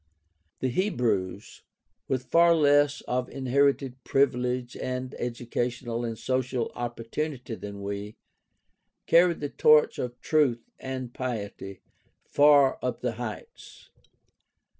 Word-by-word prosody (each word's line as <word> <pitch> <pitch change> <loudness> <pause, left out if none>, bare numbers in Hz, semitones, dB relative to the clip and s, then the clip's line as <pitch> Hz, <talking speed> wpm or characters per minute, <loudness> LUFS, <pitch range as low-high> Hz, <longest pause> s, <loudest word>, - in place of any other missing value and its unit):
The 130 - +1
Hebrews, 115 - -1 0.5
with 130 -1 -1
far 170 +2 +5
less 145 -2 +3
of 125 0 -2
inherited 135 -1 0
privilege 125 -2 0
and 130 0 -4
edu 120 0 -4
cational 120 -1 -2
and 115 -1 -5
social 130 -1 -1
opportunity 120 +3 -4
than 100 -2 -7
we, 100 +1 -5 0.9
carried 170 -1 +4
the 145 - -2
torch 150 +1 +4
of 125 0 -4
truth 135 -7 +1
and 130 -2 -5
piety 100 -6 -5 0.4
far 145 -2 +5
up 125 - -3
the 125 - -1
heights. 110 -3 -9
125 Hz, 110 wpm, -27 LUFS, 120-140 Hz, 0.9 s, far